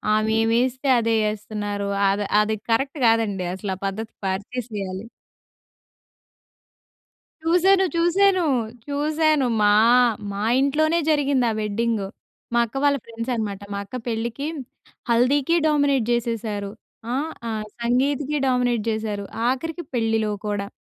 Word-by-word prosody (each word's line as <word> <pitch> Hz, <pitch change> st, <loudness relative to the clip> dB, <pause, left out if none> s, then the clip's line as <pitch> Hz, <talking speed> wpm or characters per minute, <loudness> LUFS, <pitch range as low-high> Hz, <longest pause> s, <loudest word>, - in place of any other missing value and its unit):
ఆమె 215 Hz, 0 st, +1 dB
ఏం 225 Hz, 0 st, +1 dB
యేస్తే 260 Hz, +2 st, -1 dB
అదే 230 Hz, -1 st, +1 dB
యేస్తున్నారు. 205 Hz, -1 st, -3 dB, 0.2 s
అది 205 Hz, +1 st, 0 dB, 0.2 s
అది 215 Hz, +1 st, 0 dB
కరెక్ట్ 270 Hz, +6 st, 0 dB
గాదండి 220 Hz, -5 st, +2 dB
అసల, 190 Hz, +1 st, -4 dB
ఆ -, -, -28 dB
పద్ధతి 220 Hz, +3 st, -4 dB
మార్చసేయాలి. 200 Hz, -1 st, -4 dB, 2.4 s
చూసాను, 365 Hz, +4 st, +4 dB
చూసాను. 365 Hz, +2 st, +3 dB, 0.4 s
చూసాను. 300 Hz, 0 st, +1 dB, 0.2 s
మా 205 Hz, 0 st, +5 dB, 0.6 s
మా 200 Hz, -, -4 dB, 0.2 s
ఇంట్లోనే 310 Hz, +4 st, +2 dB
జరిగింది 280 Hz, -4 st, +2 dB
ఆ -, -, -2 dB
వెడ్డింగు. 215 Hz, -1 st, -1 dB, 0.5 s
మా 235 Hz, -, +3 dB
అక్క 220 Hz, -, -16 dB
వాళ్ళ 285 Hz, -1 st, +4 dB
ఫ్రెండ్స్ 230 Hz, +2 st, -5 dB
అనమాట. 210 Hz, -3 st, -3 dB
మా 200 Hz, -, -3 dB
అక్క 200 Hz, -, -9 dB
పెళ్ళికి 235 Hz, +4 st, -3 dB, 0.6 s
హల్దీకి 265 Hz, +7 st, +3 dB
డామినేట్ 285 Hz, -5 st, +2 dB
జేసేసారు. 225 Hz, -4 st, -2 dB, 0.4 s
ఆహ్, 300 Hz, +5 st, -1 dB, 0.2 s
ఆ -, -, -2 dB, 0.3 s
సంగీత్‌కి 275 Hz, +5 st, 0 dB
డామినేట్ 245 Hz, -3 st, +1 dB
జేసారు. 215 Hz, -2 st, -3 dB, 0.2 s
ఆఖరికి 325 Hz, +7 st, -2 dB
పెళ్ళిలో 225 Hz, -2 st, +1 dB, 0.2 s
కూడా. 205 Hz, -1 st, -2 dB
235 Hz, 120 wpm, -23 LUFS, 210-285 Hz, 2.4 s, మా